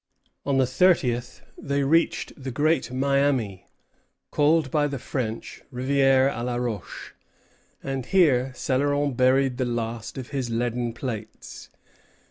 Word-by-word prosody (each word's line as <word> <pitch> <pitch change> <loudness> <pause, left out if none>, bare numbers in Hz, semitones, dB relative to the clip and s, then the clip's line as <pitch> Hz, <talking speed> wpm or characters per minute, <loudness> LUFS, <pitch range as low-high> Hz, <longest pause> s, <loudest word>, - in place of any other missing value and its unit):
On 140 -1 +2
the 130 - +4
thirtieth 125 -5 +1 0.2
they 140 0 -1
reached 165 +5 +1
the 135 -2 -7
Great 145 -1 +1
Miami, 135 -7 0 0.6
called 150 -2 +2
by 150 -1 +2
the 140 -1 -4
French, 115 -3 -5
Rivière 135 +1 +3
à 120 - -4
la 125 0 -2
Roche; 120 -6 -5 0.7
and 135 -2 -4
here 135 -9 +3
Céloron 145 +1 0
buried 130 +1 +3
the 130 - 0
last 115 -1 -4
of 130 -2 -6
his 135 -4 -3
leaden 120 0 -1
plates. 115 -3 -7
130 Hz, 125 wpm, -25 LUFS, 120-140 Hz, 0.7 s, the